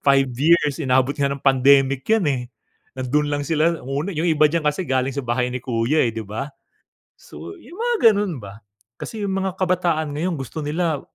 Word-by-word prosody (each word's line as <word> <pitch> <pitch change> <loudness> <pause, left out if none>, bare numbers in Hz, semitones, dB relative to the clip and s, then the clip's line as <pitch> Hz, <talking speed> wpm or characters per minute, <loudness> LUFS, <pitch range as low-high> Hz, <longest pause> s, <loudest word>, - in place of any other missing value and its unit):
5 135 -1 +3
years 150 0 +2
inabot 130 0 +1
nga 140 -1 +1
ng 140 - -6
pandemic 135 0 +4
'yan, 220 -4 +3
eh. 130 -3 -1 0.5
Nandoon 140 +3 0
lang 145 0 -1
sila 165 +3 +1
una, 140 +9 -3
yung 165 +3 0
iba 155 -2 +3
diyan 170 +2 0
kasi 150 +5 0
galing 130 0 0
sa - - 0
Bahay 125 +1 0
ni 125 - -4
Kuya, 120 +5 +1
eh, 115 - -1
'di 115 - -5
ba? 110 +8 -5 0.7
So 80 +3 -11
yung 330 +9 -14
mga 470 - +4
ganun 200 - -2
ba, 100 +2 -11 0.4
kasi 220 - -6
yung 195 -1 -1
mga 190 -1 -2
kabataan 175 -4 +1
ngayon 170 +5 -2
gusto 135 +4 -6
nila 160 -1 -1
145 Hz, 195 wpm, -21 LUFS, 130-170 Hz, 0.7 s, pandemic